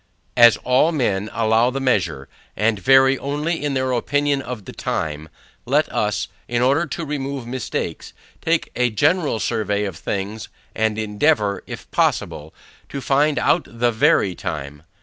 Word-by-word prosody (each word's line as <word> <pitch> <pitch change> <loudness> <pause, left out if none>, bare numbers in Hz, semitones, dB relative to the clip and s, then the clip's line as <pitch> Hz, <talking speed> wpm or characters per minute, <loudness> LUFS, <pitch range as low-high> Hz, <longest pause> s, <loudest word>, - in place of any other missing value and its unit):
As 120 -1 +7
all 130 +6 +3
men 105 - -1
allow 115 +1 +2
the 135 +2 -3
measure, 85 - 0 0.3
and 105 0 +1
vary 135 +4 +5
only 150 +4 -2
in 145 -2 -1
their 130 0 0
opinion 145 +3 0
of 120 -6 -7
the - - -8
time, 75 0 -3 0.3
let - - +2
us, - - 0 0.2
in 120 0 0
order 140 +7 +2
to 170 - -4
remove 140 -3 -4
mistakes, 125 0 -4 0.3
take 165 0 0
a 125 0 +2
general 145 - +1
survey 105 -3 -1
of 95 -4 -4
things, 100 +5 -4 0.2
and 110 -1 0
endeavour, 105 0 +1
if - - -8
possible, 75 +2 0 0.4
to 140 - -5
find 145 +2 +2
out - - +2
the 120 +1 0
VERY 105 -4 +3
time. 75 -3 -6
120 Hz, 150 wpm, -21 LUFS, 105-140 Hz, 0.4 s, As